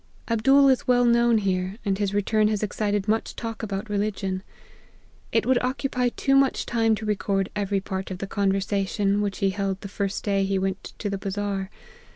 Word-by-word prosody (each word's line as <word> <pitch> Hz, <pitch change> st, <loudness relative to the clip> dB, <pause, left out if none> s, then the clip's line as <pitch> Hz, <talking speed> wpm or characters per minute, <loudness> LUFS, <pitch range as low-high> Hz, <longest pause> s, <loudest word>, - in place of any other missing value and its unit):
" -, -, -31 dB
Abdool 270 Hz, +5 st, +5 dB
is 260 Hz, -2 st, +2 dB
well 245 Hz, -1 st, +4 dB
known 235 Hz, -1 st, +4 dB
here, 190 Hz, -2 st, -1 dB
and 195 Hz, -1 st, 0 dB
his 200 Hz, -2 st, 0 dB
return 210 Hz, +1 st, +2 dB
has 215 Hz, -1 st, -1 dB
excited 205 Hz, 0 st, -1 dB
much 220 Hz, +1 st, 0 dB
talk 225 Hz, -2 st, -5 dB
about 205 Hz, -1 st, -4 dB
religion. 200 Hz, -2 st, -2 dB, 0.9 s
It -, -, +2 dB
would 255 Hz, -1 st, +3 dB
occupy 255 Hz, -1 st, 0 dB
too 270 Hz, +3 st, +1 dB
much 275 Hz, -1 st, +3 dB
time 225 Hz, -2 st, +2 dB
to 215 Hz, +1 st, -6 dB
record 195 Hz, -2 st, 0 dB
every 200 Hz, -1 st, 0 dB
part 190 Hz, 0 st, -4 dB
of 185 Hz, -, -5 dB
the 195 Hz, -, -4 dB
conver 195 Hz, 0 st, 0 dB
sation 200 Hz, +1 st, 0 dB
which 200 Hz, -2 st, -2 dB
he 195 Hz, -, +3 dB
held 195 Hz, 0 st, -2 dB
the 200 Hz, -, -6 dB
first 200 Hz, 0 st, -3 dB
day 200 Hz, -1 st, +1 dB
he 195 Hz, 0 st, 0 dB
went 190 Hz, 0 st, -2 dB
to 210 Hz, -, -3 dB
the 200 Hz, -1 st, -2 dB
Bazar. 195 Hz, -1 st, -3 dB
205 Hz, 200 wpm, -25 LUFS, 195-225 Hz, 0.9 s, Abdool